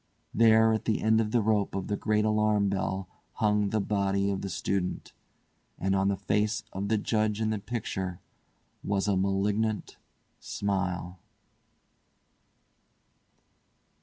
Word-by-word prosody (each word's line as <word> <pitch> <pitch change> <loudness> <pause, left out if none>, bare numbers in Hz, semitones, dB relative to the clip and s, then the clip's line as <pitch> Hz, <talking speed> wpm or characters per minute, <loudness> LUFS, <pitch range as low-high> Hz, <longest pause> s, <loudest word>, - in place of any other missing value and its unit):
There 110 0 +5
at 110 - -2
the 110 - +1
end 110 +1 +3
of 105 - -1
the 115 0 +2
rope 105 -2 +1
of 95 -1 -2
the 105 - -1
great 105 0 +1
alarm 105 -1 +2
bell 95 -1 -2 0.3
hung 105 -1 +1
the 110 - 0
body 100 -1 0
of 95 - -3
the 100 - -4
student, 90 +1 -2 0.6
and 95 +1 0
on 95 0 +2
the 100 -1 +1
face 105 +2 0
of 100 +2 -3
the 110 +1 +2
Judge 110 0 0
in 110 -1 0
the 110 - -1
picture 95 -5 -4 0.6
was 100 0 0
a 100 - +2
malignant 100 +3 0 0.4
smile. 90 -3 -3
100 Hz, 135 wpm, -28 LUFS, 95-110 Hz, 0.6 s, There